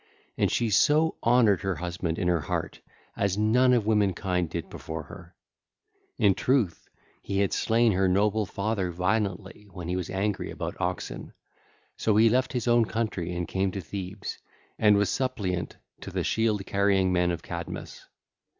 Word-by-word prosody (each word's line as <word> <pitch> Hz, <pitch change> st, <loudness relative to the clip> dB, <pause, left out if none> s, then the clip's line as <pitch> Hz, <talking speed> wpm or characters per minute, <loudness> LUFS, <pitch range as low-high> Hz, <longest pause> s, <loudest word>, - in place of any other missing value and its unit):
And -, -, +1 dB
she 115 Hz, -2 st, 0 dB
so 155 Hz, +10 st, +3 dB
honoured 115 Hz, -5 st, +4 dB
her 95 Hz, -2 st, -1 dB
husband 85 Hz, 0 st, -3 dB
in 90 Hz, -, -1 dB
her 85 Hz, -2 st, +2 dB
heart -, -, -4 dB, 0.3 s
as 100 Hz, -1 st, 0 dB
none 120 Hz, +4 st, +4 dB
of 120 Hz, -4 st, +3 dB
womankind 95 Hz, -5 st, +1 dB
did 85 Hz, 0 st, -4 dB
before 80 Hz, 0 st, -6 dB
her. 85 Hz, +4 st, -13 dB, 0.8 s
Verily 105 Hz, +1 st, +3 dB, 0.5 s
he 100 Hz, -, -3 dB
had 100 Hz, -, +1 dB
slain 115 Hz, 0 st, +3 dB
her 95 Hz, 0 st, +2 dB
noble 105 Hz, +3 st, +2 dB
father 100 Hz, -2 st, -2 dB
violently 95 Hz, +2 st, -2 dB
when 90 Hz, -2 st, -8 dB
he 90 Hz, -, -1 dB
was 90 Hz, -1 st, -3 dB
angry 100 Hz, +1 st, -2 dB
about -, -, -5 dB
oxen; -, -, -4 dB, 0.6 s
so 110 Hz, -, +1 dB
he 110 Hz, +2 st, +6 dB
left 130 Hz, +3 st, +1 dB
his 125 Hz, -2 st, -2 dB
own 120 Hz, -1 st, +4 dB
country 110 Hz, -6 st, -2 dB
and 85 Hz, -1 st, -3 dB
came 95 Hz, 0 st, 0 dB
to 95 Hz, -, -5 dB
Thebes 95 Hz, +3 st, -6 dB, 0.4 s
and 105 Hz, -1 st, +5 dB
was 100 Hz, -2 st, +1 dB
suppliant 105 Hz, -9 st, -2 dB, 0.2 s
to -, -, -8 dB
the -, -, -2 dB
shield 110 Hz, -3 st, 0 dB
carrying 100 Hz, -2 st, +2 dB
men 90 Hz, 0 st, +2 dB
of 85 Hz, -2 st, -3 dB
Cadmus. 85 Hz, -1 st, -7 dB
100 Hz, 160 wpm, -27 LUFS, 90-110 Hz, 0.8 s, he